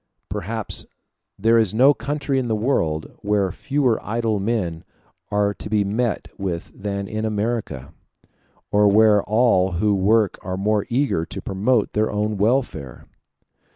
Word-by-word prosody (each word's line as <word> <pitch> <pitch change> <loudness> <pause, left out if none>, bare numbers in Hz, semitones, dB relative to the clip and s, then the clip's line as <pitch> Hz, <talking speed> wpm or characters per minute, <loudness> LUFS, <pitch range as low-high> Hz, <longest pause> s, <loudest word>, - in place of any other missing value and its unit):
Perhaps 110 +3 -3 0.5
there 115 +3 +4
is 110 -2 +1
no 135 +5 +6
country 145 -1 -2
in 125 - -2
the 110 - 0
world 85 - -1
where 100 -2 +1
fewer 135 - 0
idle 110 -1 -1
men 95 -6 -2 0.5
are 105 0 +1
to 105 - -8
be 105 -1 +2
met 110 +3 -1
with 90 -2 -4
than 100 0 -4
in 110 +1 -4
America, 105 - -3 0.8
or 105 0 +4
where 105 0 +5
all 105 -4 +2
who 105 +4 +1
work 105 +1 +2
are 95 0 -4
more 105 +1 0
eager 125 - +1
to - - -7
promote 105 +4 0
their 110 +1 +1
own 105 0 -1
welfare. 105 - -1
105 Hz, 145 wpm, -22 LUFS, 100-115 Hz, 0.8 s, no